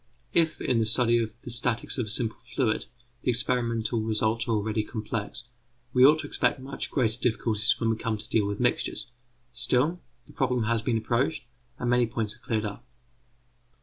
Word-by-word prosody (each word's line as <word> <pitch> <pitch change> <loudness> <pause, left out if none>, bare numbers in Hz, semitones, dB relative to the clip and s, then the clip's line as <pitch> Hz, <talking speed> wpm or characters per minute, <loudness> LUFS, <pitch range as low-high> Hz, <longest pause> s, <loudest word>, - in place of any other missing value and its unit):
] - - -36
If 160 - -6
in 125 -3 +1
the 110 - +2
study 120 +1 +3
of 110 0 -5
the 120 - -7
statics 120 +1 0
of 115 - -1
a - - -4
simple 115 +1 0 0.2
fluid 115 -6 +1 0.3
the - - -1
experimental 115 -2 0
results 110 +1 0
are - - 0
already 110 0 0
complex, 110 -1 -4 0.5
we 125 - +5
ought 150 +4 +8
to - - -7
expect - - +1
much 135 +1 -4
greater 115 -3 +1
difficulties 110 -2 +1
when 115 -1 +1
we 115 - -1
come 110 -1 -2
to 105 +1 -9
deal 105 -3 +2
with 100 0 -3
mixtures; - - 0 0.4
still 130 +8 +2 0.2
the - - -17
problem 125 -3 +1
has 115 0 +1
been 115 0 0
approached, 125 +6 0 0.3
and 125 - -3
many 120 -1 +4
points 110 -2 -1
are - - -14
already - - -24
cleared - - -4
up. 105 +3 -6
115 Hz, 195 wpm, -27 LUFS, 110-125 Hz, 0.5 s, ought